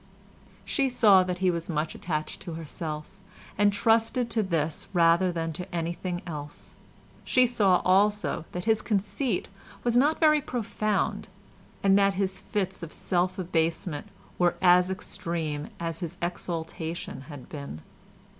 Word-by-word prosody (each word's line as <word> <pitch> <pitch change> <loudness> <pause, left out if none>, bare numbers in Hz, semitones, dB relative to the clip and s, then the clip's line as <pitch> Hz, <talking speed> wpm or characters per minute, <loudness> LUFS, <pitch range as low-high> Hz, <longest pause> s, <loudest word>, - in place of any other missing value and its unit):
She 275 -3 +1
saw 210 -6 +6
that 180 -1 -2
he 180 - +5
was 170 0 -4
much 155 -1 -1
attached 155 -3 -4
to 175 -3 -6
herself, 155 -1 -5 0.5
and 205 0 +4
trusted 225 +3 +2
to 225 - +2
this 165 -5 -1
rather 170 +1 +4
than 165 -1 -3
to 180 +3 -7
anything 175 +2 -3
else. 150 -4 -8 0.5
She 255 0 +4
saw 205 -7 +3
also 200 -2 +2
that 180 - -4
his 220 +1 +2
conceit 210 +2 -1 0.4
was 240 -1 +1
not 290 +6 +4
very 305 -2 +5
profound, 215 -4 -1 0.6
and 195 0 +5
that 195 -1 +3
his 190 0 -1
fits 190 -3 -3
of 165 -2 -7
self 180 0 -1
abasement 165 -3 -1 0.3
were 175 -1 +3
as 180 0 +5
extreme 165 -5 -3
as 165 -1 -3
his 175 -1 -5
exaltation 170 -3 -4
had 145 -4 -9
been. 140 - -7
180 Hz, 140 wpm, -27 LUFS, 165-205 Hz, 0.6 s, saw